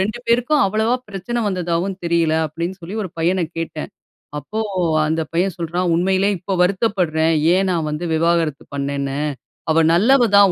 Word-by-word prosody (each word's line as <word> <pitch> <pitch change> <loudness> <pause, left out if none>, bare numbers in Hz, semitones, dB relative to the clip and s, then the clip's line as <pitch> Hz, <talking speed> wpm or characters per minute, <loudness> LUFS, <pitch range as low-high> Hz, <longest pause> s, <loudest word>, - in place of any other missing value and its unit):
2 215 +5 -1
பேருக்கும் 245 +5 +3
அவ்வளவா 220 +4 +1
பிரச்சன 210 +5 -3
வந்ததாவும் 180 0 -1
தெரியல. 170 -2 +2
அப்டின்னு 170 +5 -5
சொல்லி 190 +6 -6
ஒரு 185 - -6
பையனக் 170 0 0
கேட்டன். 160 -2 -5 0.5
அப்போ 210 +10 -5 0.5
அந்த 160 +1 0
பையன் 180 +1 0
சொல்றான் 175 +2 -1
உண்மையிலேயே 190 +3 +2
இப்ப 190 +2 -3
வருத்தப்பட்றன். 180 -5 +1 0.2
ஏன் 190 0 +1
நான் 165 -3 -1
வந்து 150 +4 -3
விவாகரத்து 165 -2 +1
பண்னேன்னு. 140 0 -2 0.5
அவ 165 0 +4
நல்லவ 240 +7 +4
தான் 200 -2 +7
180 Hz, 150 wpm, -20 LUFS, 165-195 Hz, 0.5 s, தான்